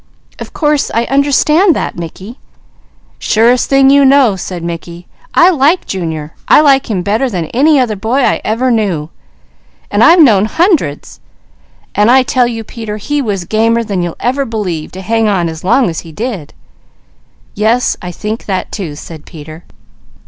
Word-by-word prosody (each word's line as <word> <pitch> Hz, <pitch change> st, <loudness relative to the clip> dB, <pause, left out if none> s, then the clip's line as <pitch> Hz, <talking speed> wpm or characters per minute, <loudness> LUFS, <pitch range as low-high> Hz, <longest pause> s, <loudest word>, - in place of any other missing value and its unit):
"Of -, -, -8 dB
course 295 Hz, -2 st, 0 dB
I 230 Hz, -, +2 dB
understand 300 Hz, +5 st, +3 dB
that, -, -, -3 dB
Mickey." 185 Hz, -, -9 dB, 0.8 s
"Surest 235 Hz, +3 st, +2 dB
thing 275 Hz, 0 st, +4 dB
you 280 Hz, 0 st, +5 dB
know!" 270 Hz, -6 st, +4 dB
said 180 Hz, -2 st, -6 dB
Mickey. 170 Hz, +1 st, -7 dB, 0.3 s
"I 355 Hz, +2 st, +6 dB
like 315 Hz, +3 st, +1 dB
Junior. 160 Hz, -5 st, -5 dB
I -, -, +6 dB
like 275 Hz, -4 st, +3 dB
him 190 Hz, -5 st, -2 dB
better 220 Hz, +7 st, 0 dB
than 180 Hz, -7 st, -3 dB
any 290 Hz, +4 st, +3 dB
other 235 Hz, -4 st, 0 dB
boy 230 Hz, +7 st, -1 dB
I -, -, +1 dB
ever 245 Hz, +4 st, 0 dB
knew, 185 Hz, -9 st, -1 dB, 0.8 s
and -, -, +2 dB
I've 340 Hz, +2 st, +6 dB
known 215 Hz, -10 st, +5 dB
hundreds. 310 Hz, -, -1 dB, 0.8 s
I 240 Hz, +6 st, +4 dB
tell 250 Hz, -1 st, +1 dB
you 225 Hz, -2 st, -5 dB
Peter, 220 Hz, -2 st, -7 dB
he 290 Hz, +7 st, -2 dB
was 200 Hz, -7 st, -3 dB
gamer 230 Hz, +4 st, +1 dB
than 200 Hz, -5 st, -3 dB
you'll 175 Hz, -1 st, -4 dB
ever 265 Hz, +3 st, -1 dB
believe 200 Hz, -, -4 dB
to 190 Hz, -, -8 dB
hang 225 Hz, +2 st, 0 dB
on 185 Hz, -5 st, 0 dB
as 160 Hz, -1 st, -7 dB
long 240 Hz, +6 st, +2 dB
as 165 Hz, -2 st, -3 dB
he 165 Hz, -, -11 dB
did." 210 Hz, -, -6 dB, 1.0 s
"Yes 225 Hz, +4 st, +1 dB
I 180 Hz, -, -6 dB
think 215 Hz, +5 st, -6 dB
that 190 Hz, -2 st, -3 dB
too," 170 Hz, -8 st, -5 dB
said 155 Hz, +1 st, -11 dB
Peter. 155 Hz, 0 st, -11 dB
220 Hz, 165 wpm, -12 LUFS, 180-265 Hz, 1.0 s, I